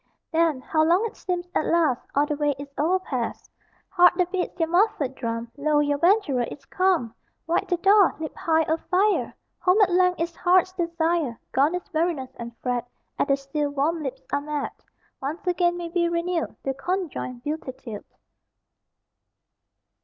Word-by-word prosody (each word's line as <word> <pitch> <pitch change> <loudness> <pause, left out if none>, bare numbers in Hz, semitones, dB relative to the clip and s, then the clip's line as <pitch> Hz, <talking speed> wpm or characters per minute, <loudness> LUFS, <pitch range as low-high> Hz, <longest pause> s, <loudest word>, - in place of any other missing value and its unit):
Then 325 -5 +2
(how 315 +3 +1
long 350 +7 +3
it 450 - -5
seems) 355 -1 -3
at - - 0
last 320 -7 +2
All 285 +1 +4
the 295 0 -2
way 290 -1 0
is 280 0 -9
overpast. 300 -7 -1 0.4
Heart 355 -2 +5
that 360 -1 0
beats 365 -1 -3
your 325 - +2
muffled 350 - +2
drum, 230 -2 -4
Lo, 295 +1 +2
your 290 -1 +1
venturer 345 - +3
is 275 +3 -6
come! 365 - +1 0.3
Wide 330 - 0
the 355 - +1
door! 390 +2 +5
Leap 315 -1 -6
high, 320 -1 +2
O 320 +1 0
fire! 390 +5 +1 0.3
Home 365 +3 +3
at 395 -4 +5
length 360 0 +3
is 335 0 -2
heart's 365 +1 +3
desire! 335 -7 -1
Gone 290 +6 +3
is 360 +1 -7
weariness 315 -5 0
and 235 0 -7
fret, 245 -1 -1 0.3
At - - +2
the 275 -1 +3
sill 285 +2 -2
warm 295 +4 0
lips 265 -2 -5
are 285 - +1
met. 295 0 -3 0.5
Once 295 +7 -4
again 350 -1 +1
may 345 -1 -5
be 340 0 +1
renewed 340 -1 -1
The 270 - -1
conjoined 295 -7 -3
beatitude. 260 -7 -5
320 Hz, 170 wpm, -25 LUFS, 280-355 Hz, 0.5 s, Heart